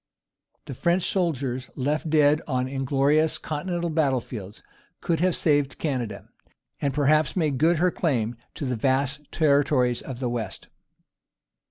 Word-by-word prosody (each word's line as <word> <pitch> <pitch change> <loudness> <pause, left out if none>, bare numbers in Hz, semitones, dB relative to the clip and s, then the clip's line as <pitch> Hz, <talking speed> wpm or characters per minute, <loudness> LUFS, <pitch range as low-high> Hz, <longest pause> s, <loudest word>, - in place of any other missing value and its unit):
The - - -6
French 170 +7 +1
soldiers 135 -10 -1
left 150 +4 -1
dead 150 0 +4
on 130 -3 0
inglorious 140 +4 +1
Continental 170 +2 -3
battle 145 -5 +2
fields 105 -4 -9 0.4
could 165 -3 -1
have 180 0 +2
saved 145 -3 +1
Canada, 125 -9 -3 0.5
and 140 - +1
perhaps 150 +1 +2
made 150 -7 0
good 165 +3 +4
her 180 +3 +2
claim 120 -10 -1 0.2
to 150 - -4
the 125 -1 -1
vast 135 +4 -1
territories 140 -5 +2
of 130 -3 -7
the 130 - -1
West. 115 -6 -5
145 Hz, 140 wpm, -25 LUFS, 130-155 Hz, 0.5 s, dead